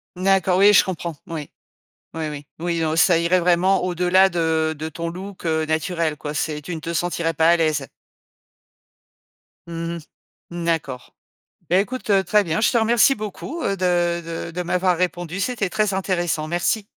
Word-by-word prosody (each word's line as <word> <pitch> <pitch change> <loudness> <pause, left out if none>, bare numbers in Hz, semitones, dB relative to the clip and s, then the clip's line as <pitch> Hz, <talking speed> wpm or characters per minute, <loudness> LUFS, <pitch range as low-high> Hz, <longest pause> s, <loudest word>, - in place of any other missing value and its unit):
D'accord, 185 0 +2
oui 205 +1 +7
je - - +7
comprends. 170 -3 -5
Oui. 155 -4 -6 0.6
Oui, 160 -1 -3
oui, 145 -1 -8
oui. 170 0 -1
Non, 160 -1 0
ça 175 0 +5
irait 170 +2 +2
vraiment 180 +2 +2
au-delà 180 +1 +3
de 160 -2 0
de 160 +2 -5
ton 170 +2 -5
look, 190 +2 -9
heu, 160 -1 0
naturel, 160 0 -1
quoi, 145 +1 -5
c'est 150 0 -2
tu 170 +4 -6
ne - - -5
te 170 +2 -4
sentirais 170 -1 -1
pas 160 +1 +3
à 170 - +4
l'aise. 155 -4 0 1.8
Mmh 170 0 -4
mh. 170 - -6 0.5
Mmh, 170 0 -5
d'accord. 145 -7 -3 0.5
Bah 180 - +4
écoute, 215 +3 -4
heu, 195 -1 +4
très 205 +4 +3
bien, 165 +3 -1
je - - +3
te - - +2
remercie 235 +3 +4
beaucoup, 215 - -6
heu, 195 - 0
de 175 -2 +1 0.3
de - - -9
de 180 +2 -4
m'avoir 180 0 +1
répondu, 175 0 -2
c'était 220 -4 -1
très 210 +1 0
intéressant, 175 -5 -1
merci. 175 +5 0
175 Hz, 180 wpm, -22 LUFS, 160-190 Hz, 1.8 s, oui